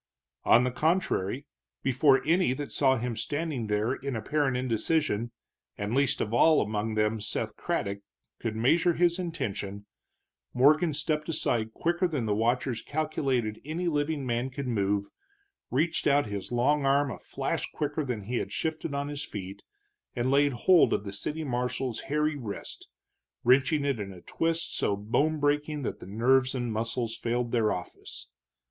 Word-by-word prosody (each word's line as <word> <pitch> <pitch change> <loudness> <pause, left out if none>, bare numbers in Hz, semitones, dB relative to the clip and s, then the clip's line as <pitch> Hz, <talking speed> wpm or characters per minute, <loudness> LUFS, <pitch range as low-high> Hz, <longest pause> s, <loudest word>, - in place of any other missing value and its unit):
On 120 - +6
the 125 - 0
contrary, 145 - 0 0.4
before 135 +1 +4
any 170 -3 +3
that 145 +2 -5
saw 130 -2 +3
him 120 0 -3
standing 145 0 -2
there 105 +4 +1
in 135 -1 -4
apparent 135 +3 0
indecision, 125 -1 0 0.5
and 105 +2 -3
least 140 0 +2
of 110 - -2
all 155 +6 +5
among 110 +1 -1
them 105 +1 +1
Seth - - -2
Craddock, 100 0 -2 0.4
could 110 -1 -3
measure 165 +10 +3
his 175 +2 +2
intention, 100 - -4 0.7
Morgan 150 +4 +4
stepped 150 +1 -1
aside 115 -8 0
quicker 175 +2 +1
than 145 -9 -2
the 105 - +1
watchers 120 +3 0
calculated 135 -7 -1
any 165 +4 -3
living 145 -2 0
man 120 +1 -1
could 135 +1 -5
move, 100 -3 0 0.6
reached 160 +6 +1
out 145 0 +4
his 100 -1 -5
long 140 +5 +2
arm 140 0 +3
a - - -7
flash - - -3
quicker 150 +1 -2
than 120 -6 -3
he 120 +5 -2
had - - -3
shifted 160 -2 -2
on 140 0 -2
his 145 0 -4
feet, 100 0 -7 0.5
and 120 +2 0
laid 140 0 +4
hold 175 +8 +5
of - - 0
the 100 -1 -6
city 150 +10 -3
marshal's 125 -2 -2
hairy 150 +1 +1
wrist, 115 -8 -7 0.6
wrenching 135 +4 +4
it 140 -5 0
in 100 -1 -5
a 90 -2 -12
twist 165 0 -2
so 100 - +1
bone 145 +10 +1
breaking 145 0 0
that - - -4
nerves 130 +6 +2
and 120 -3 -2
muscles 115 +1 -2
failed 120 0 -1
their 110 -3 +2
office. 90 - -7
130 Hz, 160 wpm, -28 LUFS, 110-150 Hz, 0.7 s, On